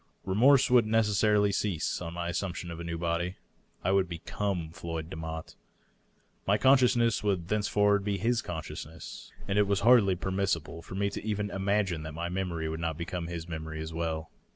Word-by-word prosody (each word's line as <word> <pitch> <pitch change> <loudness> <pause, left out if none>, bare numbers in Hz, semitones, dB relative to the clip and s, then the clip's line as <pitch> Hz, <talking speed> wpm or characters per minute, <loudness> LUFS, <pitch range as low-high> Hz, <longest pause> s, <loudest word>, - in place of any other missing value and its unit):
Re 95 - -1
morse 135 +5 +5
would 120 -3 +6
necessarily 105 -1 +3
cease, 95 -6 -1
on 85 -1 -5
my 85 0 -3
assumption 85 -1 -3
of 85 - -7
a - - -5
new 85 0 -3
body. 85 +2 -1 0.5
I 95 - +2
would 95 -2 +2
become 85 0 -3
Floyd 80 -1 -5
Demotte; 80 0 -6 0.9
my 100 +2 +4
consciousness 125 -2 +4
would 95 -5 0
thenceforward 105 -1 +2
be 100 -1 -1
his 115 +4 +1
consciousness, 80 -1 -7 0.2
and 100 +1 +1
it 105 - +4
was 100 -1 +1
hardly 110 -4 +6
permissible 90 -3 -1
for 90 - -9
me 100 +1 0
to - - -5
even 105 -1 -2
im 95 0 -4
agine 100 -5 +1
that 75 -1 -7
my 85 +1 -3
memory 90 -3 -2
would 80 +1 -3
not 80 -2 -2
become 85 0 -4
his 85 -1 -5
memory 80 -1 -5
as 80 +1 -5
well. 80 -1 -3
95 Hz, 185 wpm, -29 LUFS, 85-105 Hz, 0.9 s, would